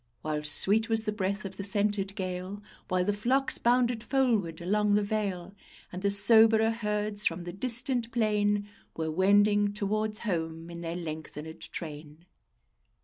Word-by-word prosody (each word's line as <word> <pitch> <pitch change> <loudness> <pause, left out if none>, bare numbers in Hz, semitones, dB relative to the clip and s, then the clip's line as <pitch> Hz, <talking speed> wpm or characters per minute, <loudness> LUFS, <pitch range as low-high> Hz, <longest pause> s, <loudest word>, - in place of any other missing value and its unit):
While 150 -1 -2
sweet 205 +9 +4
was 225 -1 +1
the 215 - 0
breath 200 0 -3
of 195 0 -7
the 200 - -5
scented 200 0 -1
gale; 185 +1 -5 0.2
While 180 -1 0
the 205 - +1
flocks 255 +7 0
bounded 240 -1 +2
foldwards 230 -12 0
along 205 +3 +1
the 210 - +2
vale, 195 -3 -3 0.4
And 180 - -6
the 200 - +1
soberer 220 +2 +5
herds 210 -2 -2
from 170 +1 -3
the 175 0 -7
distant 240 +2 +1
plain 210 -3 +1 0.3
Were 160 -1 -2
wending 205 +3 +3
towards 215 +1 -2
home 165 -4 -4
in 170 0 -8
their 165 0 -4
lengthened 160 -1 -8
train. 155 0 -9
205 Hz, 150 wpm, -28 LUFS, 175-215 Hz, 0.4 s, soberer